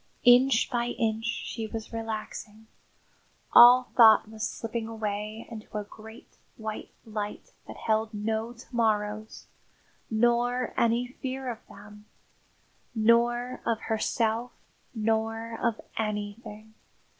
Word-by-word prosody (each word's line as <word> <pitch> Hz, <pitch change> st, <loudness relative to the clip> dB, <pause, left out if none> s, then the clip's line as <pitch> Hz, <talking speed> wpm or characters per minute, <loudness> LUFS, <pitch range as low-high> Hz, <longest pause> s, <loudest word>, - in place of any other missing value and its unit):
Inch 245 Hz, 0 st, +6 dB
by 240 Hz, -1 st, 0 dB
inch 225 Hz, -2 st, 0 dB
she 230 Hz, -1 st, -3 dB
was 225 Hz, +1 st, -7 dB
relaxing. 220 Hz, -1 st, -6 dB, 0.9 s
All 245 Hz, +1 st, +8 dB
thought 220 Hz, -3 st, +7 dB
was 215 Hz, 0 st, -4 dB
slipping 225 Hz, 0 st, -4 dB
away 215 Hz, 0 st, -4 dB
into 220 Hz, -1 st, -7 dB
a 210 Hz, -, -2 dB
great 220 Hz, +2 st, -14 dB, 0.2 s
white 220 Hz, -1 st, -6 dB, 0.2 s
light 210 Hz, -2 st, -5 dB, 0.2 s
that -, -, -9 dB
held 220 Hz, 0 st, 0 dB
no 220 Hz, +2 st, -2 dB
to 240 Hz, +1 st, -14 dB
morrows, 215 Hz, -1 st, -1 dB, 0.6 s
nor 240 Hz, +2 st, +1 dB
any 235 Hz, +1 st, +2 dB
fear 260 Hz, 0 st, -5 dB
of 225 Hz, -, -8 dB
them, 210 Hz, +1 st, -14 dB, 0.9 s
nor 240 Hz, +3 st, +2 dB
of 230 Hz, -2 st, 0 dB
herself, 225 Hz, +2 st, -1 dB, 0.4 s
nor 225 Hz, +1 st, -1 dB
of 235 Hz, -2 st, 0 dB, 0.2 s
anything. 215 Hz, 0 st, -5 dB
225 Hz, 110 wpm, -28 LUFS, 215-235 Hz, 0.9 s, All